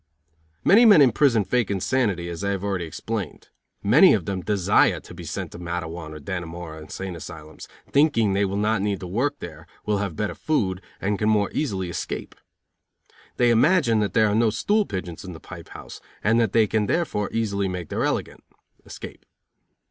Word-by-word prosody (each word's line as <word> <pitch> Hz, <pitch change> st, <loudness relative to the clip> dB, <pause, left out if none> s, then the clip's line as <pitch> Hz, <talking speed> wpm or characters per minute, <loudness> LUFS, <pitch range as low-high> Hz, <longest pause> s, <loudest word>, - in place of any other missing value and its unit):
Many 220 Hz, +5 st, +6 dB
men 205 Hz, -7 st, +8 dB
in 135 Hz, -4 st, +6 dB
prison 120 Hz, -4 st, +3 dB
fake 115 Hz, +3 st, 0 dB
insanity, 100 Hz, -3 st, 0 dB
as 85 Hz, +2 st, -6 dB
I 100 Hz, -, 0 dB
have 100 Hz, -1 st, -2 dB
already 95 Hz, -4 st, -2 dB
explained. 100 Hz, +1 st, -5 dB, 0.3 s
Many -, -, +7 dB
of -, -, -3 dB
them 95 Hz, -2 st, -3 dB
desire 100 Hz, -2 st, +2 dB
to -, -, -13 dB
be -, -, -9 dB
sent -, -, -5 dB
to -, -, -10 dB
Matteawan 85 Hz, -2 st, -5 dB
or -, -, -8 dB
Dannemora 85 Hz, -2 st, -6 dB
insane 90 Hz, +4 st, -6 dB
asylums, 80 Hz, -1 st, -10 dB, 0.2 s
thinking 140 Hz, -9 st, +3 dB
they 100 Hz, +1 st, +2 dB
will 100 Hz, 0 st, -1 dB
not 105 Hz, 0 st, +1 dB
need 100 Hz, -2 st, -1 dB
to -, -, -5 dB
work 130 Hz, -, -1 dB
there, -, -, -10 dB, 0.2 s
will 105 Hz, -1 st, 0 dB
have 100 Hz, -5 st, -3 dB
better 105 Hz, +5 st, -2 dB
food 95 Hz, -12 st, -1 dB, 0.2 s
and 100 Hz, 0 st, -1 dB
can 105 Hz, -, +1 dB
more 105 Hz, -2 st, +2 dB
easily 100 Hz, -11 st, -2 dB
escape. 85 Hz, -, -5 dB, 1.0 s
They 120 Hz, -1 st, +4 dB
imagine 120 Hz, -2 st, +4 dB
that 105 Hz, -1 st, -1 dB
there 110 Hz, -, +5 dB
are 105 Hz, -, 0 dB
no 115 Hz, +1 st, +3 dB
stool 205 Hz, -, +1 dB
pigeons 90 Hz, -4 st, -5 dB
in 95 Hz, -2 st, -8 dB
the 80 Hz, -, -10 dB
pipe -, -, -11 dB
house, -, -, -10 dB, 0.2 s
and 115 Hz, +2 st, +3 dB
that 115 Hz, -4 st, +2 dB
they 115 Hz, 0 st, +4 dB
can 105 Hz, 0 st, 0 dB
therefore 105 Hz, -11 st, -1 dB
easily 100 Hz, -3 st, -1 dB
make 90 Hz, -3 st, -5 dB
their -, -, -1 dB
elegant -, -, -2 dB, 0.4 s
(escape). -, -, -10 dB
100 Hz, 190 wpm, -24 LUFS, 90-115 Hz, 1.0 s, men